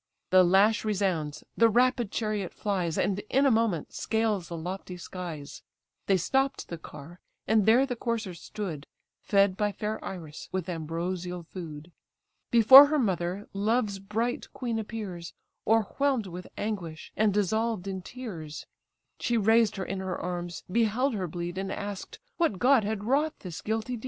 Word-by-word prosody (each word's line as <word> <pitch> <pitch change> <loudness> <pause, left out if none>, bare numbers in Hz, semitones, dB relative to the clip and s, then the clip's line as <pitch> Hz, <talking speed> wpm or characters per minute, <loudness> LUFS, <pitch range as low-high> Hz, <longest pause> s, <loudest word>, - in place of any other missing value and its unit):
The 185 0 +7
lash 195 +5 +4
resounds, 185 -8 -1
the 230 0 +5
rapid 245 -1 +2
chariot 215 -4 -2
flies, 185 -6 -1
And 200 0 +1
in 270 +2 +3
a 275 - +5
moment 220 -8 0
scales 220 -5 0
the 170 - -6
lofty 180 +2 -6
skies: 170 -5 -7 0.5
They 195 - +4
stopp'd 270 - 0
the 170 - -6
car, 160 +4 -11 0.3
and 220 -2 +3
there 245 +5 +6
the 250 -2 -3
coursers 225 -7 -3
stood, 180 -9 -6 0.3
Fed 200 -2 +3
by 205 +1 0
fair 210 +2 -4
Iris 160 -5 -7
with 185 -2 -2
ambrosial 175 +2 -3
food; 165 -2 -9 0.6
Before 260 +5 +10
her 305 +1 +1
mother, 190 - -1
love's 205 0 0
bright 225 +5 -2
queen 235 -3 -2
appears, 205 -6 -6 0.3
O'erwhelmed 225 +3 +2
with 180 0 -8
anguish, 175 -7 -5
and 215 -1 +3
dissolved 210 0 0
in 190 -1 -4
tears: 175 -10 -7 0.5
She 240 - +1
raised 225 0 +4
her 190 -2 -3
in 195 - -4
her 190 -1 -3
arms, 175 -1 -4
beheld 235 +5 +2
her 190 -4 -2
bleed, 175 +2 -4
And 195 0 -3
ask'd 200 -1 -6 0.2
what 330 - +1
god 255 +1 +4
had 205 0 -2
wrought 290 +7 0
this 175 -4 -7
guilty 225 +3 -2
deed? - - -10
200 Hz, 155 wpm, -28 LUFS, 180-225 Hz, 0.6 s, Before